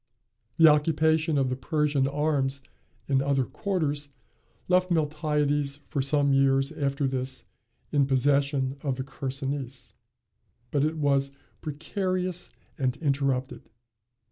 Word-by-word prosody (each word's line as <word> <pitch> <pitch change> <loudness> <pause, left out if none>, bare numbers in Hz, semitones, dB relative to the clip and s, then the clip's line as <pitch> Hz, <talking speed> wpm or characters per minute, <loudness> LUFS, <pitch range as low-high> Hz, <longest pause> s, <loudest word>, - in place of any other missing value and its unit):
The 165 -1 +8
occupation 160 +1 +3
of 135 -2 +2
the 130 - -1
Persian 145 +1 +1
arms 140 -2 0 0.4
in 135 -1 +2
other 135 -1 +1
quarters 150 -7 -2 0.6
left 185 0 +3
Miltiades 150 -3 0
for 140 - -2
some 140 0 +2
years 135 0 +3
after 140 0 -1
this 130 0 -4 0.5
in 140 -2 +3
possession 140 0 +1
of 135 -3 -1
the 130 - -4
Chersonese; 135 -1 -5 0.8
but 145 -1 +2
it 155 +1 0
was 140 -2 +1 0.3
precarious 180 +4 -2 0.3
and 130 -1 0
interrupted. 140 -3 -1
140 Hz, 115 wpm, -27 LUFS, 135-150 Hz, 0.8 s, The